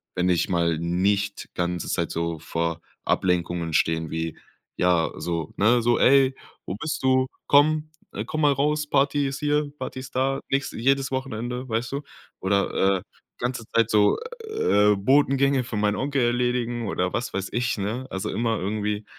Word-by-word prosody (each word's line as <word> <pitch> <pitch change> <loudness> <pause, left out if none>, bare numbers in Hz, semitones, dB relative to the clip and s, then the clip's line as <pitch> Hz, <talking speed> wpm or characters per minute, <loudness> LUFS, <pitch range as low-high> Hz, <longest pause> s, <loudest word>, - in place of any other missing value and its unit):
Wenn 90 +1 +1
ich 90 -3 +1
mal 85 -3 +1
nicht 100 +4 0
ganze 90 -1 -2
Zeit - - -1
so 85 -1 -2
vor 85 +1 -2 0.2
Ablenkungen 85 -2 0
stehe, 80 +1 +1
wie, 80 0 -3 0.4
ja 90 -2 +2
so, 85 -3 -3
ne 120 +4 +4
so: 120 +1 +3
„Ey, 135 0 +5 0.3
wo 90 - -4
bist 155 +9 -3
du? 130 0 +3 0.2
Komm, 155 +2 +4 0.2
äh, - - -4
komm 155 - -3
mal 145 -1 +5
raus, 150 +2 0
Party 140 0 +2
ist 135 0 -4
hier, 150 0 0
Party - - -5
ist 130 -1 -11
da“, 135 +1 +1
nächste 135 0 -1
jedes 135 +3 +1
Wochenende, 125 -1 -4
weißt 115 +1 -1
du? 140 - -2 0.4
Oder, 95 0 +2
äh, - - -12 0.4
ganze 120 -1 -2
Zeit 115 -1 +3
so, 105 -2 +4 0.3
äh, 105 - +3
Botengänge 135 +4 +3
für 120 -3 -5
meinen 105 0 +1
Onkel 140 -1 0
erledigen 120 -1 0
oder 90 -1 -1
was 120 - -2
weiß 95 0 -3
ich, 120 +1 0
ne? 110 +6 -3
Also 95 - -3
immer 115 -1 0
irgendwie 105 +1 -2
115 Hz, 170 wpm, -25 LUFS, 90-135 Hz, 0.4 s, Ey